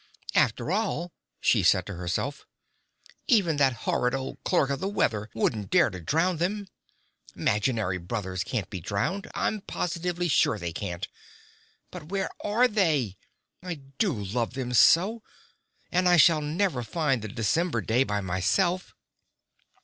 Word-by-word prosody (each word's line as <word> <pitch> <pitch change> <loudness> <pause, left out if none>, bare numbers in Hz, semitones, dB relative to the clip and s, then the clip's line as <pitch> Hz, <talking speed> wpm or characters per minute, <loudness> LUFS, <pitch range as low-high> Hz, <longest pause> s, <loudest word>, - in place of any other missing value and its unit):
"After 120 +7 +2
all," 185 -4 -1 0.3
she - - +3
said 90 - +3
to 105 - -6
herself, 90 - -3 0.8
"even 195 - +3
that 135 -2 +4
horrid 125 +1 +1
old 135 0 -6
Clerk 145 -7 +2
of 140 - -1
the 190 - -2
Weather 110 - 0
wouldn't 110 -3 -1
dare - - +4
to 95 - -7
drown 165 - +1
them! 195 +5 -2 0.7
'Maginary 105 -4 0
brothers 95 0 -3
can't 100 -1 -3
be 95 - -4
drowned, 130 - -2
I'm 215 - -1
positively 175 -1 -2
sure 130 -7 +3
they 85 -4 -5
can't. 90 +4 -4 0.8
But 150 - -9
where 195 0 -2
are 230 +5 +3
they? 155 - +1 0.4
I 180 -1 -4 0.2
do 205 -5 +3
love 115 +1 -3
them 125 -2 -3
so! 190 - +5 0.7
And 180 0 +3
I 175 - +6
shall 165 -2 +6
never 155 -2 0
find 135 0 0
the 110 - -5
December 120 - 0
day 115 +5 +2
by 105 -5 -2
myself." 170 - 0
135 Hz, 145 wpm, -27 LUFS, -, 0.8 s, I